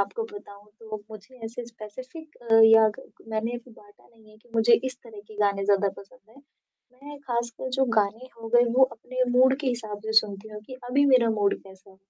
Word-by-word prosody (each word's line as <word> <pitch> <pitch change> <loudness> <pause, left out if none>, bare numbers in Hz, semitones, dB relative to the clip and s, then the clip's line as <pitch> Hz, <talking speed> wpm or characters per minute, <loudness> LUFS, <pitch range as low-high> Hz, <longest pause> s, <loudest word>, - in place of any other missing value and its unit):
आपको 200 - -2
बताऊँ 205 - -12
तो 220 -1 -6
मुझे 215 +4 -13
ऐसे 235 +2 -6
स्पेसिफिक 255 +8 -11 0.3
या 220 0 +7
कक - - -16
मैंने 225 +2 -2
बाँटा 205 -3 -20
नहीं 220 -2 -22
है 215 - -19
कि 240 - -27
मुझे 230 +1 +5
इस 255 - -10
तरह 220 -3 -11
के 215 - -13
गाने 200 -1 +1
ज़्यादा 200 0 +3
पसंद 215 +2 -17
हैं, 275 +4 -19 0.5
मैं 285 +3 -12
खासकर 235 +1 -3
जो 265 - +4
गाने 215 +5 -1
हो 225 - -7
गए 240 0 +7
वो 265 - +8
अपने 255 +1 -4 0.2
मूड 260 +1 +5
के 285 - -4
हिसाब 220 -5 -3
से 220 - -2
सुनती 205 0 -9
हूँ 210 -1 -9
कि 255 - -9
अभी 280 +3 +3
मेरा 235 -3 +5
मूड 205 -2 +1
कैसा 190 0 -17
है, 190 - -20
225 Hz, 205 wpm, -26 LUFS, 210-255 Hz, 0.5 s, वो